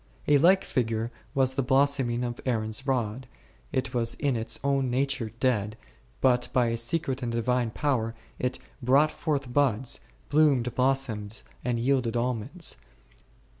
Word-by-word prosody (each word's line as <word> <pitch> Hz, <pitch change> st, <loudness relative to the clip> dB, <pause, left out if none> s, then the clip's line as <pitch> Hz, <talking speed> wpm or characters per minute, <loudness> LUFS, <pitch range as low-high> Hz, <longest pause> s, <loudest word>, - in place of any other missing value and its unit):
A 145 Hz, -1 st, +5 dB
like 185 Hz, +5 st, +5 dB
figure 115 Hz, -1 st, -1 dB, 0.2 s
was 130 Hz, -1 st, +2 dB
the 135 Hz, -, 0 dB
blossom 135 Hz, 0 st, +2 dB
ing 120 Hz, +1 st, -1 dB
of 120 Hz, -1 st, -4 dB
Aaron's 115 Hz, +1 st, -1 dB
rod, 125 Hz, -1 st, -1 dB, 0.4 s
it 130 Hz, 0 st, -1 dB
was 120 Hz, -1 st, 0 dB
in 140 Hz, -2 st, 0 dB
its 115 Hz, 0 st, -1 dB
own 135 Hz, -2 st, +1 dB
nature 130 Hz, -2 st, 0 dB
dead, 110 Hz, -4 st, 0 dB, 0.4 s
but 125 Hz, -2 st, +3 dB
bv 120 Hz, -2 st, +3 dB
a -, -, -1 dB
secret 130 Hz, +2 st, -1 dB
and 120 Hz, -2 st, -2 dB
Divine 120 Hz, +1 st, 0 dB
power 115 Hz, -3 st, -1 dB, 0.2 s
it 125 Hz, 0 st, -1 dB, 0.2 s
brought 140 Hz, +5 st, +4 dB
forth 140 Hz, -5 st, -2 dB
buds, 130 Hz, -3 st, +2 dB, 0.3 s
bloomed 140 Hz, -6 st, +3 dB
blossoms 125 Hz, -6 st, 0 dB, 0.2 s
and 120 Hz, -1 st, 0 dB
yielded 120 Hz, -1 st, +1 dB
almonds 125 Hz, -, -2 dB
r -, -, -29 dB
125 Hz, 150 wpm, -27 LUFS, 115-135 Hz, 0.4 s, A